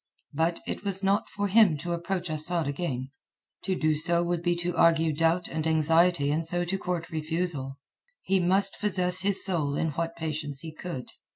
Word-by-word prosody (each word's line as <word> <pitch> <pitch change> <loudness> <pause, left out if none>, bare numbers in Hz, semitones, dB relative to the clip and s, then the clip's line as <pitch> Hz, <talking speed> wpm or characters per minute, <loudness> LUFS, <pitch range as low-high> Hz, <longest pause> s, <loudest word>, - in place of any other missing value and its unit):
But, 165 +3 -1
it - - -5
was 195 -1 -1
not 200 +3 +1
for 205 0 -2
him 200 -6 +4
to 170 +4 -4
approach 175 0 -3
Asad 160 +2 0
again; 135 -3 -4 0.5
to 190 0 0
do 155 -3 +1
so 170 +3 +2
would 175 -1 -2
be 175 0 0
to 175 0 -2
argue 165 -2 +3
doubt 165 +3 +1
and 160 0 -3
anxiety 160 -1 +2
and 160 +2 -1
so 175 +1 +3
to 190 +2 -2
court 180 -3 -4
refusal. 155 -4 -3 0.5
He 195 0 +1
must 190 +2 +1
possess 185 -3 +3
his 200 0 +4
soul 155 -7 +1
in 160 +1 -1
what 165 +3 -3
patience 150 -3 -4
he 160 -1 -8
could. 160 -6 -7
170 Hz, 185 wpm, -27 LUFS, 155-180 Hz, 0.5 s, him